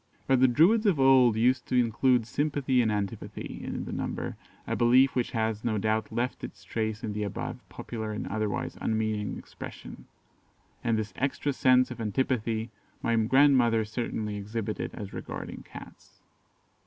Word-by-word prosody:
But 135 Hz, -1 st, +3 dB
the 130 Hz, -, +6 dB
Druids 185 Hz, -, +4 dB
of 175 Hz, -8 st, +3 dB
old 130 Hz, -4 st, +6 dB
used 125 Hz, +3 st, +2 dB
to 125 Hz, -, +2 dB
include 120 Hz, +1 st, +2 dB
sympathy 140 Hz, -1 st, +1 dB
and 110 Hz, -2 st, +1 dB
antipathy 100 Hz, -2 st, -4 dB
in -, -, -4 dB
the -, -, -6 dB
number, -, -, -3 dB, 0.3 s
a -, -, -2 dB
belief 125 Hz, +3 st, +4 dB
which 125 Hz, -2 st, 0 dB
has, 110 Hz, -2 st, -1 dB
no 110 Hz, -2 st, 0 dB
doubt, 110 Hz, +2 st, 0 dB
left 125 Hz, +2 st, -2 dB
its -, -, -8 dB
trace 110 Hz, -1 st, -3 dB
in 105 Hz, -, -3 dB
the 105 Hz, -, -3 dB
above 100 Hz, -2 st, -4 dB
popular 110 Hz, -2 st, -5 dB
and 105 Hz, -, -4 dB
otherwise 110 Hz, -1 st, -2 dB
unmeaning 110 Hz, -1 st, -1 dB
expression; -, -, -10 dB, 0.8 s
and 115 Hz, -1 st, +1 dB
this 110 Hz, -3 st, -3 dB
extra 140 Hz, +1 st, -1 dB
sense 130 Hz, -1 st, +4 dB
of 120 Hz, -, -6 dB
antipathy 115 Hz, 0 st, -1 dB, 0.3 s
my 115 Hz, -, +2 dB
grandmother 120 Hz, -1 st, +4 dB
certainly 105 Hz, -2 st, -3 dB
exhibited 105 Hz, +1 st, -4 dB
as 100 Hz, -3 st, -7 dB
regarding -, -, -6 dB
Cats. -, -, -13 dB
115 Hz, 155 wpm, -28 LUFS, 110-130 Hz, 0.8 s, the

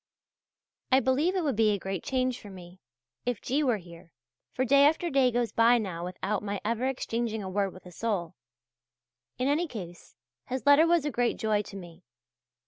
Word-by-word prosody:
I 260 Hz, -, +6 dB
believe 270 Hz, +8 st, +1 dB
it 370 Hz, -, 0 dB
would 280 Hz, -6 st, 0 dB
be 220 Hz, 0 st, +3 dB
a 205 Hz, -, +1 dB
great 190 Hz, -1 st, -5 dB
change 255 Hz, -1 st, -1 dB
for 205 Hz, -, -11 dB
me, 180 Hz, -1 st, -12 dB, 0.4 s
if 245 Hz, -3 st, -2 dB
G. 275 Hz, +4 st, -1 dB
were 250 Hz, -6 st, +2 dB
here, 170 Hz, -2 st, -14 dB, 0.4 s
for 260 Hz, -, -1 dB
day 280 Hz, +2 st, +5 dB
after 320 Hz, +3 st, 0 dB
day 270 Hz, -2 st, +4 dB
goes 240 Hz, -1 st, -1 dB
by 235 Hz, +1 st, +5 dB
now 185 Hz, -7 st, -4 dB
without 190 Hz, +3 st, -3 dB
my 200 Hz, -1 st, -3 dB
ever 230 Hz, +3 st, 0 dB
exchanging 230 Hz, -4 st, -2 dB
a 190 Hz, -, -5 dB
word 200 Hz, 0 st, 0 dB
with 185 Hz, -, -15 dB
a 180 Hz, -, -11 dB
soul. 180 Hz, -4 st, -2 dB, 1.0 s
In 255 Hz, -, 0 dB
any 310 Hz, +5 st, +1 dB
case 175 Hz, -, -9 dB, 0.3 s
his 260 Hz, +1 st, -4 dB
letter 290 Hz, +3 st, +6 dB
was 340 Hz, -3 st, +3 dB
a 295 Hz, -, -1 dB
great 240 Hz, -1 st, 0 dB
joy 215 Hz, -2 st, +1 dB
to 205 Hz, -, -11 dB
me. 175 Hz, -1 st, -12 dB
230 Hz, 195 wpm, -28 LUFS, 195-265 Hz, 1.0 s, I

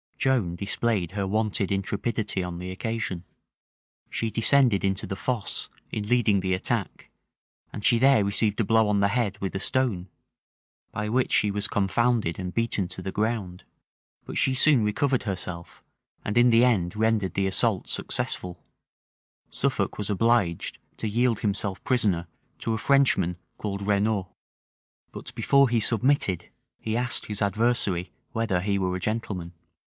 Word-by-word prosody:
Joan 120 Hz, -11 st, +1 dB
displayed 100 Hz, -1 st, -1 dB
her 100 Hz, -1 st, -2 dB
wonted 105 Hz, -1 st, 0 dB
intrepidity 100 Hz, +1 st, -2 dB
on 90 Hz, -1 st, -5 dB
the 90 Hz, +1 st, -6 dB
occasion. 100 Hz, -3 st, -3 dB, 0.9 s
She 115 Hz, -1 st, -2 dB
descended 120 Hz, -2 st, +3 dB
into 95 Hz, 0 st, 0 dB
the 95 Hz, -, -4 dB
fosse, 115 Hz, 0 st, -2 dB, 0.2 s
in 105 Hz, -2 st, -3 dB
leading 110 Hz, -5 st, +3 dB
the 95 Hz, 0 st, 0 dB
attack: 90 Hz, -, -3 dB, 0.6 s
and 105 Hz, -, -6 dB
she 120 Hz, -, +5 dB
there 130 Hz, -5 st, +5 dB
received 105 Hz, +2 st, +1 dB
a -, -, +3 dB
blow 110 Hz, +1 st, +3 dB
on 105 Hz, -1 st, +2 dB
the 100 Hz, 0 st, +3 dB
head 105 Hz, -3 st, 0 dB
with 95 Hz, -, -3 dB
a -, -, -1 dB
stone, 100 Hz, -7 st, 0 dB, 0.8 s
by 105 Hz, 0 st, -3 dB
which 125 Hz, +4 st, +1 dB
she 105 Hz, -, +3 dB
was 105 Hz, 0 st, -1 dB
confounded 105 Hz, -2 st, +1 dB
and 90 Hz, -1 st, -4 dB
beaten 110 Hz, -3 st, 0 dB
to 95 Hz, +1 st, -9 dB
the 95 Hz, -, -3 dB
ground: 105 Hz, -5 st, -2 dB, 0.6 s
but -, -, -3 dB
she 130 Hz, -, +2 dB
soon 135 Hz, -3 st, +5 dB
recovered 130 Hz, +5 st, +1 dB
herself, 90 Hz, -5 st, -6 dB, 0.4 s
and 105 Hz, -, -2 dB
in 120 Hz, +1 st, +6 dB
the 115 Hz, +1 st, +5 dB
end 95 Hz, -8 st, +1 dB
rendered 110 Hz, -3 st, +1 dB
the 100 Hz, -, +1 dB
assault 95 Hz, -, +1 dB
successful: 90 Hz, -1 st, -3 dB, 0.9 s
Suffolk -, -, -1 dB
was 105 Hz, -, -3 dB
obliged 105 Hz, -5 st, +1 dB, 0.2 s
to -, -, -3 dB
yield 115 Hz, +1 st, +1 dB
himself 100 Hz, -2 st, -2 dB
prisoner 100 Hz, -9 st, +1 dB, 0.3 s
to 115 Hz, -, -2 dB
a 110 Hz, -, -2 dB
Frenchman 115 Hz, -11 st, +3 dB, 0.2 s
called 100 Hz, -1 st, -4 dB
Renaud; 100 Hz, -2 st, +1 dB, 0.8 s
but -, -, -9 dB
before 140 Hz, -2 st, +4 dB
he 115 Hz, -1 st, +2 dB
submitted, 110 Hz, -, +1 dB, 0.3 s
he 110 Hz, +1 st, -2 dB
asked 125 Hz, 0 st, -1 dB
his 105 Hz, -1 st, -2 dB
adversary 100 Hz, -4 st, 0 dB, 0.2 s
whether 110 Hz, -7 st, 0 dB
he 100 Hz, +1 st, 0 dB
were 90 Hz, -1 st, -1 dB
a -, -, -3 dB
gentleman. 95 Hz, -5 st, -3 dB
105 Hz, 155 wpm, -26 LUFS, 95-115 Hz, 0.9 s, in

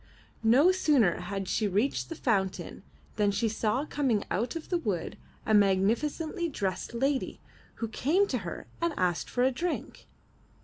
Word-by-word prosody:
No 255 Hz, +11 st, +5 dB
sooner 290 Hz, -, +3 dB
had 195 Hz, +1 st, -4 dB
she 210 Hz, +3 st, +1 dB
reached 205 Hz, +8 st, 0 dB
the 330 Hz, -, -5 dB
fountain 195 Hz, -9 st, -1 dB, 0.4 s
than 205 Hz, -1 st, +3 dB
she 225 Hz, +3 st, 0 dB
saw 220 Hz, +5 st, 0 dB
coming 260 Hz, -9 st, 0 dB
out 235 Hz, -, -1 dB
of 330 Hz, -, -6 dB
the 350 Hz, -, +1 dB
wood 195 Hz, -, -2 dB, 0.3 s
a 220 Hz, -, +1 dB
magnificently 235 Hz, -, +2 dB
dressed 200 Hz, -3 st, -3 dB
lady 270 Hz, +2 st, 0 dB, 0.4 s
who 230 Hz, -, -3 dB
came 305 Hz, -, +2 dB
to 250 Hz, -, 0 dB
her 175 Hz, -4 st, -6 dB, 0.2 s
and 335 Hz, -2 st, 0 dB
asked 180 Hz, -2 st, 0 dB
for 245 Hz, -, 0 dB
a 260 Hz, -, +4 dB
drink. 335 Hz, +7 st, -4 dB
235 Hz, 160 wpm, -29 LUFS, 200-295 Hz, 0.4 s, No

